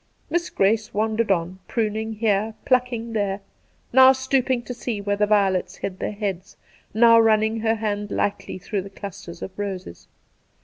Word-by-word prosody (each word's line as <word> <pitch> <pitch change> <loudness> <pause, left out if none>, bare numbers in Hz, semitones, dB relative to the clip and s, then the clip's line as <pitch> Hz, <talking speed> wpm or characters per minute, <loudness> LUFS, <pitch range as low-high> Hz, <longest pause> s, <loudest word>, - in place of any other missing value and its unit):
Miss 345 +1 0
Grace 215 +3 +1
wandered 220 +1 0
on, 180 0 0
pruning 220 -1 -1
here, 215 0 0
plucking 245 -3 0
there, 200 -2 -1 0.5
now 260 +1 +8
stooping 260 -1 0
to 250 - -6
see 235 -3 -4
where 205 0 -1
the 210 0 +1
violets 195 -3 +2
hid 185 -1 -5
their - - -2
heads, 200 -2 -5 0.3
now 230 +1 +6
running 220 0 +3
her 225 0 +1
hand 210 -1 -3
lightly 200 -1 -2
through 195 +2 -3
the 195 - -9
clusters 195 -3 -9
of - - -6
roses. 190 - -6
215 Hz, 160 wpm, -23 LUFS, 200-230 Hz, 0.5 s, now